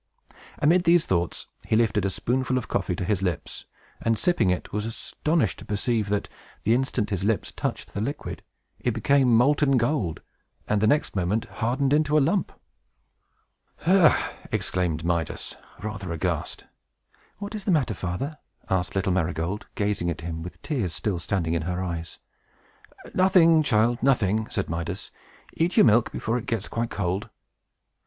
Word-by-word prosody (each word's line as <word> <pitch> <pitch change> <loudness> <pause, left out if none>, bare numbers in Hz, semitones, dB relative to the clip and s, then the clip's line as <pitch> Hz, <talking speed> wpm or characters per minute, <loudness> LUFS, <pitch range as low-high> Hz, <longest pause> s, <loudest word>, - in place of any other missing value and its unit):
Amid 170 +5 +3
these 170 0 +5
thoughts, 85 -2 -1 0.2
he - - +2
lifted 110 -3 +2
a - - +2
spoonful 130 +5 0
of 125 - -3
coffee 95 -2 -1
to 90 - -3
his 100 -1 0
lips, 90 -3 -3 0.4
and, 115 -1 +1
sipping 175 - +2
it, 90 - -2
was 105 +1 -1
astonished 155 +7 -1
to - - -10
perceive 105 0 0
that, 105 0 0 0.4
the 110 - +3
instant 125 -4 0
his 95 -2 -1
lips 110 +1 0
touched - - -4
the 100 - -2
liquid, 140 +6 -4 0.4
it 120 -2 -1
became 125 +1 +4
molten 140 +2 +4
gold, 115 - 0 0.4
and, 105 -1 +1
the 110 - +4
next 145 0 +2
moment, 95 +4 0
hardened 130 +4 0
into 150 0 +3
a - - +7
lump! 165 +7 +1 1.3
"Ha!" 180 -1 +4 0.2
exclaimed 85 -3 -1
Midas, 85 -3 -2 0.3
rather 100 -4 -4
aghast. 85 -1 -2 0.7
"What 205 +1 -6
is 210 -3 -5
the 195 - +2
matter, 140 -9 +2
father?" 95 - -4 0.3
asked 90 -1 0
little 95 0 +1
Marygold, 90 +2 -1
gazing 100 -4 0
at 85 -1 -4
him, 80 -1 -5
with 90 +2 -7
the - - -27
tears 105 - -2
still 100 -5 -1
standing 85 -1 -1
in 85 - 0
her 90 +3 -2
eyes. 85 -2 -5 1.0
"Nothing, 180 -4 +5
child, 120 -2 +2
nothing!" 110 -5 +2
said 100 - -2
Midas. 85 0 -4 0.4
"Eat 170 +3 0
your - - +8
milk, 115 0 +4
before 115 +2 -1
it - - -10
gets 110 -3 -1
quite 115 0 -2
cold." 95 0 -2
110 Hz, 160 wpm, -25 LUFS, 90-135 Hz, 1.3 s, your